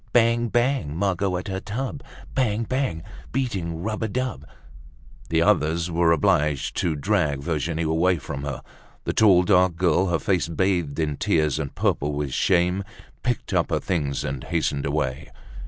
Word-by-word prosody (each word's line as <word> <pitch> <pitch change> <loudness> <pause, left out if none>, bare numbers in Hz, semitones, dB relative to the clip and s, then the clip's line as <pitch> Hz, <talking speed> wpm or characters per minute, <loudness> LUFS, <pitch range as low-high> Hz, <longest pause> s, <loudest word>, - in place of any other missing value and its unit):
Bang! 120 0 +3
Bang! 120 - 0
Margot 95 -1 0
at 90 - -6
her 95 -1 -3
tub. 130 +8 -4 0.3
Bang! 115 -4 +1
Bang! 130 -11 -2 0.3
Beating 90 -11 -2
rub 110 +1 -3
a 110 - 0
dub—" 125 - -3 0.8
The 80 0 +3
others 85 -3 +2
were 85 0 +3
obliged 80 -6 +2
to 85 -3 0
drag 70 0 0
Virginie 80 0 -1
away 85 +3 +2
from 70 -1 -6
her. 70 -2 -5 0.4
The - - -2
tall, 95 -5 +5
dark 90 -2 +3
girl, 90 +2 +2
her 85 -2 +1
face 90 0 0
bathed 85 -3 0
in 75 -3 -1
tears 75 -2 +1
and 70 -3 -4
purple 75 +1 0
with 70 -2 -3
shame, 90 +2 +2 0.4
picked 125 -3 -2
up - - +2
her - - +1
things 75 -7 -1
and 65 -1 -4
hastened 70 0 -1
away. 70 -1 -2
85 Hz, 160 wpm, -24 LUFS, 75-100 Hz, 0.8 s, tall